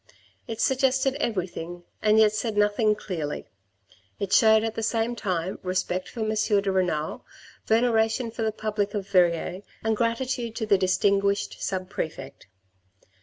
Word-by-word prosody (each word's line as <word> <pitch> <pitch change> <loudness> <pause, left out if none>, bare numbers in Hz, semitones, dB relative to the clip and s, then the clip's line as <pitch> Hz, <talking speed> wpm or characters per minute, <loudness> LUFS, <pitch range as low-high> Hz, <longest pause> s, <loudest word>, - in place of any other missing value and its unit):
It 225 - -5
suggested 265 0 +2
everything 175 - -3 0.2
and 215 0 +4
yet 215 -1 +5
said 215 0 -2
nothing 210 +1 +3
clearly. 160 -8 -4 0.7
It 200 0 -3
showed 220 0 +6
at 225 -1 -2
the 225 - -4
same 225 +1 0
time 185 -4 -2
respect 185 0 -2
for 235 - -7
M. 215 - 0
de 205 -2 +1
Renal, 180 -5 -1 0.4
veneration 225 +1 +2
for 230 - -6
the 220 0 +1
public 210 -1 -2
of 200 -2 -3
Verrieres 180 0 +2 0.2
and 220 0 +1
gratitude 235 0 -1
to 225 - -2
the 210 -2 +4
distinguished 200 +1 +1
sub 185 -1 -2
prefect. 140 - -6
210 Hz, 145 wpm, -26 LUFS, 185-225 Hz, 0.7 s, showed